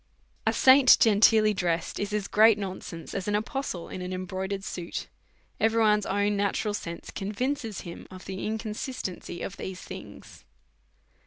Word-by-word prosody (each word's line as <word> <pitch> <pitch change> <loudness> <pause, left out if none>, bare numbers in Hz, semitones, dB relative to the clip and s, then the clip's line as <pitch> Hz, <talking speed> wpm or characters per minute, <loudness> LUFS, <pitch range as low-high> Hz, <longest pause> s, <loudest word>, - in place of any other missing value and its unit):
A - - +5
saint 260 0 +7
genteelly 215 0 +5
dressed 175 -3 -1
is 205 0 -2
as 210 -1 -1
great 220 0 +6
nonsense 185 -4 -6
as 195 0 -3
an 205 - +1
apostle 215 -4 -3
in 185 - -7
an 180 0 -5
embroidered 190 +1 -4
suit; 175 -3 -5 0.5
every 225 +1 +3
one's 210 -2 +3
own 205 +1 +1
natural 205 +1 0
sense 170 -4 -6
convinces 225 +2 -3
him 170 -2 -9
of 185 0 -11
the 190 -1 -5
inconsistency 215 -4 -4
of 200 - -6
these 185 -1 -6
things. - - -10
205 Hz, 150 wpm, -27 LUFS, 185-220 Hz, 0.5 s, saint